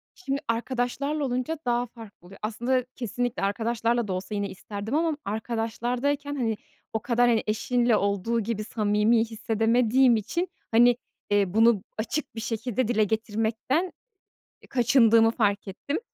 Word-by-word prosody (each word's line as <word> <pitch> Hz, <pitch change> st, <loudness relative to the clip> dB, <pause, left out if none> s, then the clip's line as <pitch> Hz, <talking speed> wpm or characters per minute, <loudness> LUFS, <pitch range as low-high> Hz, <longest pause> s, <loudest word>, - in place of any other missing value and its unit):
Şimdi, 280 Hz, -6 st, -3 dB
arkadaşlarla 255 Hz, +5 st, -1 dB
olunca 255 Hz, +5 st, -2 dB
daha 240 Hz, 0 st, +1 dB
farklı 220 Hz, -6 st, -14 dB
oluyor. 195 Hz, -, -14 dB
Aslında, 240 Hz, +4 st, 0 dB
kesinlikle 245 Hz, -1 st, -2 dB
arkadaşlarla 230 Hz, +2 st, 0 dB
da 185 Hz, -, -2 dB
olsa 190 Hz, +3 st, -4 dB
yine 200 Hz, -1 st, -1 dB
isterdim 205 Hz, +6 st, -5 dB
ama 320 Hz, -2 st, +1 dB
arkadaşlardayken, 240 Hz, +6 st, -2 dB
hani, 225 Hz, -5 st, -1 dB, 0.4 s
o 220 Hz, -, 0 dB
kadar, 245 Hz, 0 st, +3 dB
hani, 225 Hz, -2 st, +2 dB
eşinle 240 Hz, +2 st, +2 dB
olduğu 200 Hz, +3 st, 0 dB
gibi 215 Hz, 0 st, -2 dB
samimi 210 Hz, +1 st, +2 dB
hissedemediğim 230 Hz, +2 st, +3 dB
için, 340 Hz, -, -1 dB, 0.2 s
hani, 240 Hz, +1 st, +5 dB, 0.3 s
eee, 200 Hz, -2 st, +2 dB
bunu 225 Hz, -2 st, +4 dB
açık 230 Hz, +5 st, -3 dB
bir 225 Hz, -, -4 dB
şekilde 230 Hz, +1 st, -1 dB
dile 220 Hz, -3 st, +2 dB
getirmekten 225 Hz, -, -1 dB, 0.7 s
e, -, -, -16 dB
kaçındığımı 230 Hz, -3 st, +5 dB
fark 205 Hz, -4 st, 0 dB
ettim. 285 Hz, -, -3 dB
230 Hz, 140 wpm, -26 LUFS, 215-245 Hz, 0.7 s, hani